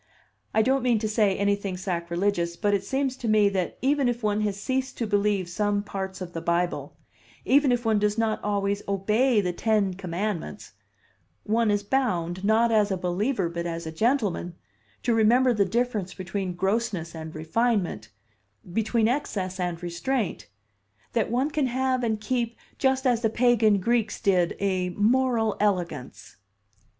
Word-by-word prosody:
I 220 Hz, -, +3 dB
don't 265 Hz, +2 st, +2 dB
mean 240 Hz, -2 st, +2 dB
to 215 Hz, 0 st, -1 dB
say 210 Hz, -3 st, +2 dB
anything 200 Hz, -2 st, 0 dB
sacrilegious, 175 Hz, 0 st, -1 dB
but 205 Hz, +1 st, +1 dB
it 195 Hz, -1 st, +1 dB
seems 265 Hz, +4 st, -1 dB
to 240 Hz, -, -5 dB
me 215 Hz, -2 st, +4 dB
that 190 Hz, -3 st, -2 dB
even 275 Hz, -1 st, +2 dB
if 240 Hz, -1 st, -3 dB
one 210 Hz, 0 st, +1 dB
has 205 Hz, -2 st, -1 dB
ceased 260 Hz, +4 st, -2 dB
to 235 Hz, -, -1 dB
believe 205 Hz, -3 st, +1 dB
some 205 Hz, +3 st, 0 dB
parts 190 Hz, -2 st, -5 dB
of 175 Hz, -1 st, -6 dB
the 165 Hz, -, -4 dB
Bible, 175 Hz, +1 st, -1 dB, 0.5 s
even 280 Hz, -1 st, +4 dB
if 245 Hz, -1 st, 0 dB
one 220 Hz, -2 st, +3 dB
does 210 Hz, +1 st, +1 dB
not 225 Hz, -1 st, 0 dB
always 200 Hz, -1 st, 0 dB
obey 210 Hz, +4 st, +2 dB
the 180 Hz, -2 st, -2 dB
Ten 210 Hz, -1 st, +1 dB
Commandments, 180 Hz, -, -4 dB, 0.7 s
one 225 Hz, +1 st, +1 dB
is 205 Hz, 0 st, +1 dB
bound, 185 Hz, -7 st, -1 dB
not 225 Hz, +3 st, +3 dB
as 210 Hz, -2 st, +3 dB
a 190 Hz, -, -1 dB
believer 185 Hz, +4 st, -1 dB
but 170 Hz, 0 st, -4 dB
as 170 Hz, 0 st, -4 dB
a 160 Hz, -, -4 dB
gentleman, 205 Hz, -, 0 dB, 0.5 s
to 235 Hz, -, +2 dB
remember 240 Hz, +3 st, +4 dB
the 205 Hz, -3 st, +2 dB
difference 215 Hz, -2 st, -1 dB
between 185 Hz, 0 st, -4 dB
grossness 190 Hz, -3 st, -1 dB
and 160 Hz, -1 st, -8 dB
refinement, 170 Hz, -, -1 dB, 0.6 s
between 220 Hz, +1 st, +1 dB
excess 195 Hz, -8 st, -2 dB
and 175 Hz, -1 st, -3 dB
restraint 175 Hz, +6 st, -2 dB, 0.7 s
that 230 Hz, -3 st, +1 dB
one 260 Hz, +6 st, 0 dB
can 295 Hz, -3 st, +1 dB
have 255 Hz, 0 st, 0 dB
and 220 Hz, -2 st, 0 dB
keep 235 Hz, -1 st, -2 dB, 0.2 s
just 265 Hz, 0 st, +1 dB
as 245 Hz, -3 st, +2 dB
the 225 Hz, -, +2 dB
pagan 225 Hz, -3 st, +3 dB
Greeks 225 Hz, +1 st, 0 dB
did, 185 Hz, -5 st, +2 dB
a 185 Hz, -2 st, 0 dB
moral 230 Hz, 0 st, +2 dB
elegance." 180 Hz, -10 st, -2 dB
205 Hz, 160 wpm, -26 LUFS, 185-235 Hz, 0.7 s, me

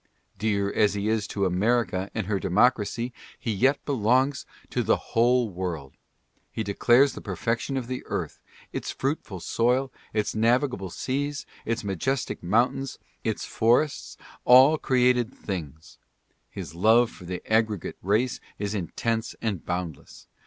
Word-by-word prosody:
Dear 100 Hz, -2 st, 0 dB
as 105 Hz, -1 st, +3 dB
he 100 Hz, +1 st, -1 dB
is 110 Hz, -2 st, 0 dB
to 100 Hz, -1 st, -1 dB
America 95 Hz, +1 st, +1 dB
and 110 Hz, -3 st, -1 dB
her 100 Hz, 0 st, 0 dB
democracy, 120 Hz, +4 st, +1 dB, 0.2 s
he 115 Hz, -, -3 dB
yet 130 Hz, +8 st, +3 dB
belongs 130 Hz, +1 st, +1 dB, 0.2 s
to -, -, 0 dB
the -, -, +3 dB
whole 120 Hz, +1 st, +2 dB
world. 85 Hz, -7 st, -4 dB, 0.6 s
He 110 Hz, -, -3 dB
declares 120 Hz, +7 st, +4 dB
the -, -, -8 dB
perfection 115 Hz, +4 st, -2 dB
of 130 Hz, -, -2 dB
the 125 Hz, +1 st, -4 dB
earth -, -, -4 dB, 0.2 s
— -, -, -25 dB
its -, -, -4 dB
fruitful 130 Hz, -, -3 dB
soil, 125 Hz, +6 st, +1 dB, 0.2 s
its 105 Hz, -1 st, -1 dB
navigable 115 Hz, -2 st, +1 dB
seas, 140 Hz, +8 st, -3 dB, 0.2 s
its 115 Hz, 0 st, -1 dB
majestic 120 Hz, +8 st, -2 dB
mountains, 120 Hz, +8 st, +1 dB, 0.3 s
its -, -, -2 dB
forests, 125 Hz, +6 st, +1 dB, 0.3 s
all 130 Hz, +5 st, +7 dB
created 125 Hz, -1 st, +2 dB
things. 80 Hz, -5 st, -7 dB, 0.5 s
His -, -, -7 dB
love 110 Hz, +7 st, +4 dB
for 90 Hz, -, -13 dB
the 90 Hz, +1 st, -5 dB
aggregate 110 Hz, -3 st, 0 dB
race 110 Hz, +7 st, +1 dB, 0.2 s
is 100 Hz, 0 st, -3 dB
intense 110 Hz, +4 st, -2 dB
and 105 Hz, -7 st, -2 dB
boundless. 90 Hz, -4 st, -5 dB
110 Hz, 140 wpm, -26 LUFS, 100-125 Hz, 0.6 s, all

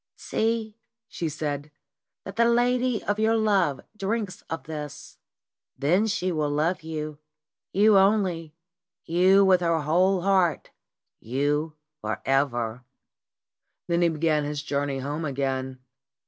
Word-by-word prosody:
"See," 225 Hz, -1 st, -2 dB, 0.3 s
she 165 Hz, -, -3 dB
said, 145 Hz, -1 st, -4 dB, 0.6 s
"that 195 Hz, -, -7 dB
the 235 Hz, +1 st, +4 dB
lady 245 Hz, 0 st, +2 dB
of 205 Hz, +1 st, -1 dB
your 220 Hz, +1 st, +3 dB
love 200 Hz, -10 st, +2 dB
drinks 210 Hz, -1 st, -3 dB
of 165 Hz, -, -4 dB
this. 150 Hz, -2 st, -8 dB, 0.6 s
Then 150 Hz, +9 st, +2 dB
will 220 Hz, -, +1 dB
she 185 Hz, -3 st, -1 dB
love 155 Hz, +2 st, 0 dB
you; 155 Hz, -2 st, -5 dB, 0.5 s
you 205 Hz, +1 st, +5 dB
only; 185 Hz, -6 st, +1 dB, 0.5 s
you, 185 Hz, +4 st, +5 dB
with 185 Hz, -2 st, +4 dB
her 165 Hz, -2 st, +1 dB
whole 180 Hz, +5 st, +2 dB
heart, 185 Hz, -5 st, +2 dB, 0.5 s
you 145 Hz, +5 st, -1 dB, 0.2 s
for 110 Hz, -3 st, -3 dB
ever." 125 Hz, -4 st, 0 dB, 1.0 s
Then 170 Hz, 0 st, +1 dB
he 170 Hz, -, +4 dB
began 155 Hz, -1 st, +1 dB
his 145 Hz, 0 st, -4 dB
journey 140 Hz, -2 st, -1 dB
home 145 Hz, +4 st, -4 dB
again. 130 Hz, -2 st, -2 dB
165 Hz, 125 wpm, -26 LUFS, 145-195 Hz, 1.0 s, you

